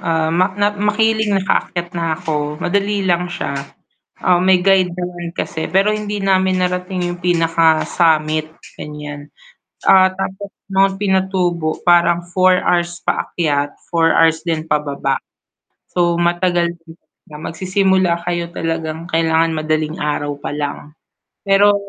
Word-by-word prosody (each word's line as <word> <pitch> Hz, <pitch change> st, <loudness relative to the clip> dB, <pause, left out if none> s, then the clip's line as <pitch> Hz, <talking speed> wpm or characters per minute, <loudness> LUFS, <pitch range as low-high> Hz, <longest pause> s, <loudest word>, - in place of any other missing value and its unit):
ah, 160 Hz, -1 st, 0 dB
mak 185 Hz, +3 st, +1 dB
nat 205 Hz, 0 st, +1 dB
Makiling 215 Hz, 0 st, +2 dB
nakaakyat 180 Hz, -2 st, -1 dB
na 165 Hz, -2 st, -1 dB
ako, 150 Hz, -3 st, -3 dB
madali 200 Hz, +2 st, 0 dB
lang 180 Hz, 0 st, +1 dB
siya, 175 Hz, -, -4 dB, 0.7 s
ah, 180 Hz, -1 st, +4 dB
may 185 Hz, 0 st, +3 dB
guide 185 Hz, -2 st, +3 dB
naman 175 Hz, -1 st, -5 dB
kasi 160 Hz, -3 st, -3 dB
pero 195 Hz, +5 st, +2 dB
hindi 210 Hz, -1 st, -3 dB
namin 190 Hz, -1 st, +2 dB
narating 180 Hz, 0 st, -2 dB
yung 175 Hz, -, -8 dB
pinaka 165 Hz, -2 st, +2 dB
summit, 155 Hz, -2 st, +1 dB, 0.3 s
gan'yan, 150 Hz, -1 st, -8 dB, 0.6 s
ah, 190 Hz, -1 st, +7 dB
tapos 195 Hz, +1 st, -5 dB, 0.2 s
Mount 195 Hz, 0 st, +3 dB
Pinatubo 185 Hz, -5 st, 0 dB
parang 175 Hz, 0 st, +4 dB
4 185 Hz, 0 st, +4 dB
hours 175 Hz, 0 st, +1 dB
paakyat, 145 Hz, -4 st, -1 dB, 0.2 s
4 165 Hz, -1 st, +3 dB
hours 160 Hz, -1 st, +4 dB
din 160 Hz, -2 st, -1 dB
pababa, 145 Hz, -3 st, -1 dB, 0.7 s
so, 175 Hz, -1 st, +2 dB
matagal 175 Hz, 0 st, +1 dB, 0.5 s
magsisimula 185 Hz, +2 st, 0 dB
kayo 175 Hz, -1 st, -2 dB
talagang 165 Hz, 0 st, -3 dB
kailangan 160 Hz, 0 st, +2 dB
madaling 155 Hz, 0 st, -1 dB
araw 145 Hz, -1 st, -1 dB
pa -, -, -5 dB
lang, 145 Hz, 0 st, -5 dB, 0.5 s
pero 200 Hz, +1 st, +5 dB
175 Hz, 125 wpm, -18 LUFS, 160-190 Hz, 0.7 s, ah